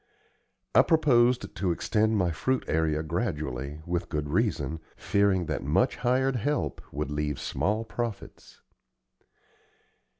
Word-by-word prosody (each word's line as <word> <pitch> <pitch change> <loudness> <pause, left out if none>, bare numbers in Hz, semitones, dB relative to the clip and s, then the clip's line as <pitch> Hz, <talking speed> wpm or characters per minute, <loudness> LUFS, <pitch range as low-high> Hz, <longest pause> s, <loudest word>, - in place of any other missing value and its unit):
I - - +8
proposed 125 -7 +3
to 95 -3 0
extend 110 +5 +1
my 90 -3 +1
fruit 130 +11 0
area 80 -1 +1
gradually, 75 - -3
with 85 0 -2
good 75 -1 -2
reason, 80 - 0 0.2
fearing 100 -3 +2
that 75 -3 -2
much - - +2
hired 130 +1 +1
help 145 +6 -1
would 70 - -3
leave 75 -2 -2
small 105 - -1
profits. 115 -2 -6
95 Hz, 120 wpm, -28 LUFS, 75-120 Hz, 0.2 s, I